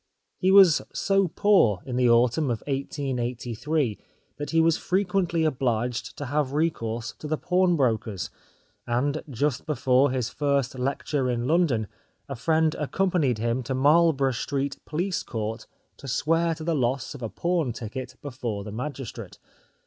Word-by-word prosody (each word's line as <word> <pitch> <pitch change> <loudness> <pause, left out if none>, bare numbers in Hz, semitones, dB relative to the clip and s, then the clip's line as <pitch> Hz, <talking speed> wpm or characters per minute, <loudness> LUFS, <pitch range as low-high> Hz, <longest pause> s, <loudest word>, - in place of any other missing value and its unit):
He 185 - +2
was 190 -5 +7
so 195 -1 +2
poor 165 - +3
in 125 - -4
the 125 -1 +3
autumn 120 +5 +3
of 115 -3 -2
1883 130 -2 -2 0.4
that 145 - -5
he 165 - +2
was 165 0 +4
frequently 180 -3 0
obliged 125 -4 -1
to 145 - -4
have 140 0 -1
recourse 120 -8 -1
to 150 - -6
the 155 +1 -1
pawnbrokers, 140 - +1 0.6
and 140 +6 0
just 140 +2 -1
before 135 -2 +3
his 125 -3 -1
first 140 -1 -1
lecture 135 0 -1
in 120 -1 -1
London, 150 -8 +2 0.4
a 135 - -5
friend 160 +5 +2
accompanied 155 - +1
him 115 +3 -1
to 130 +2 -3
Marlborough 145 0 +4
Street 140 +1 -3
Police 175 +5 -1
Court 110 -1 -5 0.3
to 140 - -10
swear 165 +5 +1
to 160 - -8
the 165 +1 0
loss 130 -2 -1
of 140 - -10
a 115 - -3
pawn 170 - 0
ticket 120 +3 -6
before 120 -7 -4
the 105 - -7
magistrate. 130 +3 -6
140 Hz, 150 wpm, -26 LUFS, 120-160 Hz, 0.6 s, was